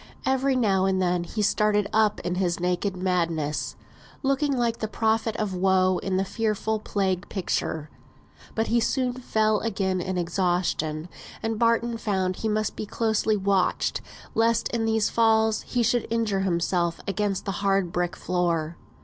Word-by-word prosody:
Every 265 0 +2
now 195 -6 +2
and 190 -1 +1
then 180 -1 +1
he 210 +4 -2
started 210 0 +2
up 215 -1 +3
in 175 - -2
his 180 -2 0
naked 180 +2 -1
madness, 170 -5 -1 0.5
looking 275 0 +1
like 235 -1 0
the 220 - -2
prophet 220 +1 0
of 210 -3 -2
woe 185 0 +3
in 190 -1 -1
the 190 - +1
fearful 220 0 -1
plague 195 -3 -1
picture; 160 -5 -2 0.6
but 225 - +1
he 235 +1 +2
soon 250 +2 0
fell 215 -4 +1
again 190 -4 -1
in 185 +1 -3
exhaustion, 175 -3 0 0.4
and 225 -1 -1
Barton 230 0 +2
found 190 -4 -1
he 220 - -2
must 215 0 -1
be 215 - -5
closely 220 -1 +1
watched, 195 -1 +1 0.3
lest 230 0 +2
in 230 -2 -1
these 220 -1 +1
falls 220 -1 +3
he 245 -2 +1
should 240 +1 +1
injure 225 -4 0
himself 170 -2 0
against 200 -1 -1
the 195 - -1
hard 195 -3 +1
brick 175 0 -1
floor. 170 -2 -1
200 Hz, 160 wpm, -25 LUFS, 180-225 Hz, 0.6 s, up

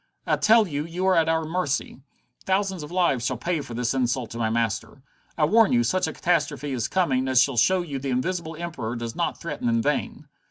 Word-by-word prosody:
I - - +2
tell 220 -1 +5
you 145 -3 -3
you 170 +3 -4
are 190 - +4
at 165 -1 +3
our 160 0 +1
mercy. 155 -6 -2 0.4
Thousands 190 -2 0
of 150 - -8
lives 175 -9 +1
shall 125 +1 -1
pay 165 +5 -1
for 120 -4 -8
this 120 0 -1
insult 125 -2 -1
to 115 - -6
my 110 -1 +1
master. 115 +2 -2 0.3
I 155 - +3
warn 220 - +4
you, 120 -1 +4
such 185 +11 +1
a - - -4
catastrophe 155 -4 -1
is 125 -2 -1
coming 135 -9 +1
as 130 -1 +4
shall 130 0 +3
show 180 +10 +3
you 145 -5 -5
the 135 +1 -4
Invisible 165 +5 -2
Emperor 155 -9 -5
does 115 -1 -5
not 170 - -2
threaten 145 -7 -3
in 115 0 +2
vain!" 150 0 -2
145 Hz, 225 wpm, -25 LUFS, 125-175 Hz, 0.4 s, tell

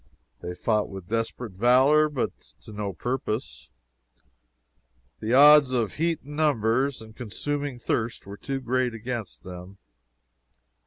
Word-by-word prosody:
They 90 - -6
fought 105 +2 0
with 95 -2 -9
desperate 115 0 -3
valor, 130 +9 +4
but 140 -4 -2 0.3
to - - -12
no 105 -1 -3
purpose; 110 - -4 1.5
the 115 +3 0
odds 145 -1 +8
of 115 -4 0
heat 165 +1 -1
and 145 +2 -9
numbers, 135 -3 +1
and 110 0 -14
consuming 140 +4 -4
thirst, 115 -1 -2
were 100 +1 -9
too 135 +3 -4
great 125 -1 0
against 115 -4 -6
them. 90 +2 -10
120 Hz, 125 wpm, -26 LUFS, 105-135 Hz, 1.5 s, odds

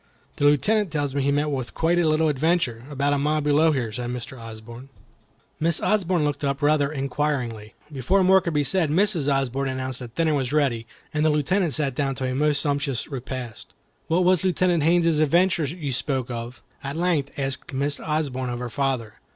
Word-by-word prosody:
"The 145 - +1
Lieutenant 205 +8 +3
tells 145 -3 -2
me 140 - 0
he 140 +1 +1
met 145 +1 0
with 130 -3 -4
quite 170 +2 +2
a 170 - +2
little 155 +1 +2
adventure, 150 -5 0
about 145 0 0
a 145 - +1
mile 150 +2 +1
below 150 +2 +3
here," 125 -6 -1
said 120 +2 -4
Mr. 125 +1 -6
Osborne. 115 +2 -10 0.7
Miss 165 +1 +1
Osborne 185 -6 +1
looked 145 0 -2
up 140 0 -1
inquiringly. 140 -6 -1 0.2
Before 180 +9 +2
more 190 +1 +5
could 170 - -2
be 145 - +3
said 160 +3 +1
Mrs. 165 -3 +2
Osborne 135 0 0
announced 130 -1 -4
that 125 -1 -9
dinner 165 -2 +2
was 135 -3 -1
ready, 130 -7 +1 0.3
and 150 0 +1
the 155 - +4
Lieutenant 155 +3 +1
sat 140 -4 0
down 135 0 -1
to 130 0 -3
a 130 - -1
most 145 +1 +2
sumptuous 140 -4 -1
repast. 130 -4 -7 0.3
"What 170 +3 +2
was 185 -1 +3
Lieutenant 180 -2 +2
Haines's 165 0 +3
adventure 170 +2 +3
you 145 -1 -4
spoke 130 -1 -2
of?" 120 +1 -6 0.2
at 140 +1 -4
length 165 -5 0
asked 135 -1 -4
Miss 140 +2 -1
Osborne 140 -5 -2
of 120 - -3
her 120 -1 -5
father. 125 -5 -2
145 Hz, 190 wpm, -24 LUFS, 130-160 Hz, 0.7 s, more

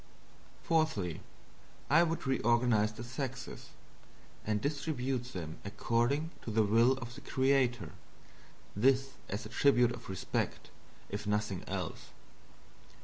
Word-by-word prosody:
'" - - -26
Fourthly, 155 - +1 0.7
I 160 +4 +6
would 165 -3 0
reorganizes 120 -4 +2
the 115 - -6
sexes, 130 +1 -5 0.7
and 105 -1 0
distribute 135 -3 -1
them 80 -4 -6
accordingly 120 +9 0
to - - -6
the 110 0 +3
will 115 +5 +5
of 120 -2 -6
the - - -10
creator. 130 - +1 0.8
This 135 +5 +3 0.2
as 105 +4 -3
a - - -7
tribute 125 -4 +4
of - - -8
respect, 95 -1 -2 0.4
if 105 +1 -4
nothing 105 -2 0
else. - - -4
120 Hz, 120 wpm, -33 LUFS, 105-135 Hz, 0.8 s, I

